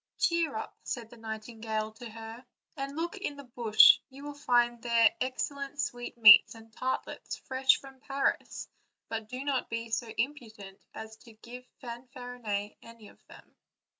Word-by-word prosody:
"Cheer 335 Hz, -3 st, +1 dB
up/' 220 Hz, -, -6 dB
said 230 Hz, -3 st, -5 dB
the 240 Hz, -, -13 dB
night 220 Hz, -1 st, -6 dB
ingale 220 Hz, -2 st, -3 dB
to 240 Hz, -, -8 dB
her, 225 Hz, +2 st, -9 dB, 0.3 s
"and 275 Hz, 0 st, -5 dB
look 340 Hz, +5 st, -3 dB
in 370 Hz, -7 st, -4 dB
this 280 Hz, -, -10 dB
bush; 220 Hz, -3 st, +7 dB
you 275 Hz, +1 st, -12 dB
will 290 Hz, 0 st, -6 dB
find 240 Hz, -4 st, +2 dB
there 235 Hz, +4 st, +4 dB
excellent 280 Hz, +2 st, -3 dB
sweetmeats 235 Hz, -5 st, +6 dB
and 225 Hz, 0 st, -15 dB
tartlets 260 Hz, +3 st, -3 dB
fresh 265 Hz, 0 st, +2 dB
from 270 Hz, -1 st, -14 dB
Paris; 275 Hz, +1 st, -2 dB, 0.4 s
but 220 Hz, -1 st, -4 dB
do 255 Hz, +2 st, -5 dB
not 275 Hz, -3 st, -1 dB
be 230 Hz, 0 st, -4 dB
so 235 Hz, +1 st, -1 dB
imprudent 220 Hz, -7 st, -4 dB, 0.2 s
as 220 Hz, 0 st, -8 dB
to 230 Hz, -1 st, -16 dB
give 240 Hz, +3 st, -11 dB, 0.2 s
Fanfarinet 240 Hz, -4 st, -6 dB
any 230 Hz, -2 st, -14 dB
of -, -, -22 dB
them." -, -, -17 dB
240 Hz, 160 wpm, -30 LUFS, 225-265 Hz, 0.4 s, bush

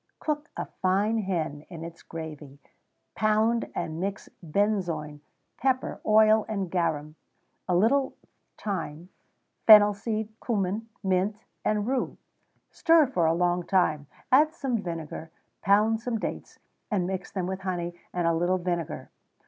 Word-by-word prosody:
_ -, -, -52 dB
Cook 300 Hz, +1 st, -2 dB
a -, -, -2 dB
fine 200 Hz, +4 st, 0 dB
hen 165 Hz, -7 st, -2 dB
in 165 Hz, -2 st, -8 dB
its 170 Hz, 0 st, -9 dB
gravy; 155 Hz, -4 st, -8 dB, 0.6 s
pound 220 Hz, +2 st, +1 dB
and 160 Hz, +1 st, -3 dB
mix 195 Hz, +2 st, -4 dB
benzoin, 170 Hz, -5 st, -1 dB, 0.4 s
pepper, 260 Hz, 0 st, 0 dB
oil, 215 Hz, 0 st, +5 dB
and 195 Hz, -5 st, -2 dB
garum, 155 Hz, -4 st, -1 dB, 0.6 s
a 180 Hz, -, +3 dB
little 260 Hz, +9 st, +3 dB, 0.4 s
thyme, 175 Hz, -4 st, -4 dB, 0.6 s
fennel 210 Hz, -2 st, +9 dB
seed, 215 Hz, +1 st, -3 dB
cummin, 215 Hz, 0 st, -1 dB
mint, 195 Hz, +3 st, 0 dB, 0.2 s
and 210 Hz, -1 st, +1 dB
rue; 260 Hz, +1 st, -1 dB, 0.5 s
stir 330 Hz, -2 st, +5 dB
for 180 Hz, -11 st, +1 dB
a 165 Hz, -, +3 dB
long 175 Hz, 0 st, +1 dB
time; 155 Hz, -6 st, +1 dB, 0.2 s
add 305 Hz, +5 st, +5 dB
some 250 Hz, -8 st, -1 dB
vinegar; 165 Hz, -3 st, -6 dB, 0.3 s
pound 215 Hz, +3 st, +3 dB
some 240 Hz, -1 st, -2 dB
dates, -, -, -5 dB, 0.3 s
and 195 Hz, -5 st, 0 dB
mix 185 Hz, 0 st, -4 dB
them 185 Hz, -3 st, -2 dB
with 190 Hz, +1 st, -3 dB
honey 175 Hz, -2 st, -3 dB, 0.2 s
and 175 Hz, -1 st, -1 dB
a 165 Hz, -, +3 dB
little 175 Hz, +3 st, +1 dB
vinegar. 175 Hz, -2 st, -3 dB
190 Hz, 140 wpm, -27 LUFS, 170-220 Hz, 0.6 s, fennel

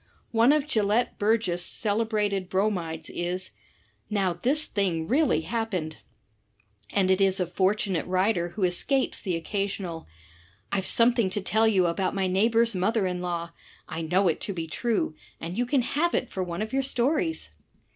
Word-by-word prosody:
One 230 Hz, +3 st, +5 dB
of 300 Hz, -1 st, +2 dB
Gelett 220 Hz, -3 st, +1 dB
Burgess* 205 Hz, -5 st, +1 dB
celebrated 210 Hz, -3 st, 0 dB
Bromides 180 Hz, -5 st, -1 dB
is, 180 Hz, +2 st, -3 dB, 0.6 s
"Now 195 Hz, -4 st, +1 dB
this 270 Hz, -, +2 dB
jk' -, -, -14 dB
I -, -, -28 dB
thing 175 Hz, -6 st, 0 dB
really 285 Hz, -, +2 dB
happened!" 185 Hz, -5 st, -3 dB, 0.9 s
And 190 Hz, -2 st, +2 dB
it 190 Hz, +1 st, +3 dB
is 195 Hz, 0 st, +3 dB
a 180 Hz, -, +1 dB
fortunate 190 Hz, 0 st, 0 dB
writer 185 Hz, -1 st, +1 dB
who 195 Hz, +3 st, -4 dB
escapes 260 Hz, +10 st, +1 dB
the 185 Hz, -4 st, -1 dB
occasional, 190 Hz, -1 st, -3 dB, 0.6 s
"IVe 190 Hz, -1 st, -1 dB
something 235 Hz, -3 st, +3 dB
to 200 Hz, +2 st, -2 dB
tell 220 Hz, +3 st, +2 dB
you 190 Hz, -5 st, +3 dB
about 185 Hz, +3 st, 0 dB
my 195 Hz, -1 st, +1 dB
neighbor's 225 Hz, +5 st, +2 dB
mother 200 Hz, +3 st, +1 dB
in 180 Hz, -1 st, -2 dB
law; 170 Hz, -1 st, -3 dB, 0.4 s
I 165 Hz, -, -5 dB
know 180 Hz, +4 st, +2 dB
it 165 Hz, -, 0 dB
to 200 Hz, -, -4 dB
be 165 Hz, -3 st, -4 dB
true, 215 Hz, +1 st, -1 dB, 0.3 s
and 170 Hz, +2 st, -5 dB
you 245 Hz, +2 st, 0 dB
can 260 Hz, -1 st, +2 dB
have 335 Hz, +8 st, 0 dB
it 255 Hz, -, -1 dB
for 190 Hz, -, -3 dB
one 175 Hz, +3 st, -3 dB
of 220 Hz, -, -7 dB
your 270 Hz, -, +2 dB
stories!" 290 Hz, +5 st, 0 dB
195 Hz, 170 wpm, -26 LUFS, 180-225 Hz, 0.9 s, One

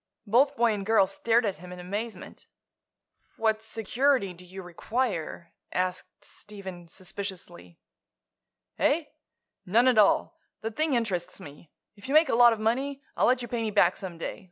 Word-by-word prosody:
Both 265 Hz, +7 st, +3 dB
boy 235 Hz, -2 st, +3 dB
and 205 Hz, -1 st, -4 dB
girl 220 Hz, -1 st, +4 dB
stared 225 Hz, +5 st, +1 dB
at 195 Hz, -6 st, -2 dB
him 180 Hz, +2 st, -11 dB
in 180 Hz, -, -8 dB
amazement. 200 Hz, +2 st, -6 dB, 0.9 s
"What 220 Hz, -1 st, +1 dB
security 225 Hz, 0 st, 0 dB
do 180 Hz, +1 st, -13 dB
you 185 Hz, +1 st, -9 dB
require?" 175 Hz, -1 st, -3 dB, 0.2 s
asked 185 Hz, 0 st, -3 dB
Stephen, 190 Hz, -4 st, -10 dB
suspiciously. 185 Hz, -2 st, -8 dB, 1.0 s
"Eh? 320 Hz, +4 st, +3 dB, 0.6 s
None 230 Hz, +7 st, +4 dB
at 250 Hz, -4 st, +5 dB
all. 205 Hz, -, +3 dB, 0.2 s
The 225 Hz, -, -3 dB
thing 310 Hz, +4 st, +1 dB
interests 185 Hz, -7 st, -2 dB
me. 145 Hz, +2 st, -12 dB, 0.3 s
If 200 Hz, +2 st, -12 dB
you 275 Hz, -, 0 dB
make 310 Hz, -2 st, +6 dB
a -, -, +1 dB
lot 240 Hz, 0 st, +7 dB
of 225 Hz, -, -2 dB
money, 265 Hz, +6 st, -1 dB
I'll -, -, +3 dB
let 250 Hz, 0 st, +2 dB
you -, -, -5 dB
pay 235 Hz, 0 st, -2 dB
me 220 Hz, -, -1 dB
back 195 Hz, -4 st, +4 dB
some 180 Hz, -3 st, -7 dB
day. 165 Hz, -, -5 dB
210 Hz, 165 wpm, -27 LUFS, 180-235 Hz, 1.0 s, lot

